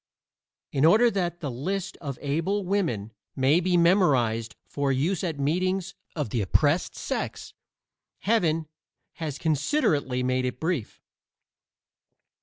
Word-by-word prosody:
In 140 - 0
order 220 +9 +6
that 175 -4 -2
the 145 -4 -3
list 185 +10 -3
of 140 -5 -6
able 165 +8 0
women 160 - -1 0.2
may 135 +5 +4
be 180 0 +2
memorized 130 - +3
for 140 -1 -1
use 155 +9 0
at 165 -5 -2
meetings 185 +6 0 0.2
of 150 -10 -3
the 120 - 0
oppressed 145 - +2
sex, - - -4 0.7
Heaven 165 -8 +1 0.5
has 155 -4 -4
considerately 150 - +1
made 130 0 +1
it 125 0 -3
brief. 160 - -3
155 Hz, 120 wpm, -26 LUFS, 135-185 Hz, 0.7 s, order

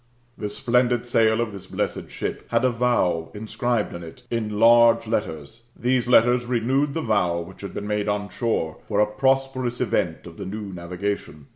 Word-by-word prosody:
The 105 - -4
splendid 125 +1 +1
sail 115 -1 +3
of 115 -2 -2
thi& 95 -2 -10
blesaed - - -2
ship - - -5
had - - +2
a 130 - +3
vow 115 -9 +1
inscribed 110 +1 -1
in 85 - -7
it 85 +9 -11
in 110 -3 -2
large 115 0 +6
letters. 110 0 -4
These 125 0 +1
letters 120 0 +4
renewed 130 +4 0
the 160 - -1
vow 90 -6 +1
[which 85 +3 -11
had 100 -2 -7
been 100 - -4
made 105 0 -1
on 105 0 -1
shore] 110 -10 -1
for 105 -2 0
a 105 - +6
(Hosperous 130 +1 0
event - - -1
of - - -11
the - - -6
new 100 0 -6
navigation. 90 -3 -5
110 Hz, 180 wpm, -24 LUFS, 100-120 Hz, -, large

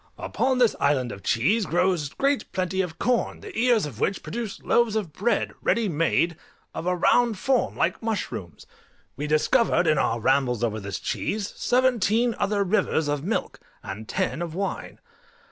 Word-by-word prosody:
Upon 260 0 0
this 245 -3 +3
island 135 -4 +1
of 100 - -8
cheese 190 - +1
grows 175 -3 +1
great 275 - -1
plenty 190 0 0
of 170 -3 -5
corn, 245 +3 0
the - - -10
ears 235 -3 +3
of 130 -7 -8
which 190 - -1
produce 230 -2 -5
loaves 235 -2 +2
of 195 -8 -2
bread, 215 +5 0
ready 230 -2 +1
made, 165 0 +1 0.4
of 170 - -5
a 180 - +2
round 230 +4 +3
form 260 +5 +1
like - - 0
mushrooms. 205 - -4 0.5
We 145 +3 -4
discovered, 170 +5 +3
in 155 -3 +3
our 115 -2 +1
rambles 125 -1 +1
over 110 -2 0
this 100 -1 -5
cheese, 205 -1 -3
seventeen 245 -2 +2
other 200 0 +1
rivers 180 -5 +1
of 145 -1 -1
milk, 205 +6 -2 0.2
and 105 +3 -7
ten 185 -3 -1
of 170 -2 -4
wine. 195 +1 -4
185 Hz, 165 wpm, -25 LUFS, 145-225 Hz, 0.5 s, this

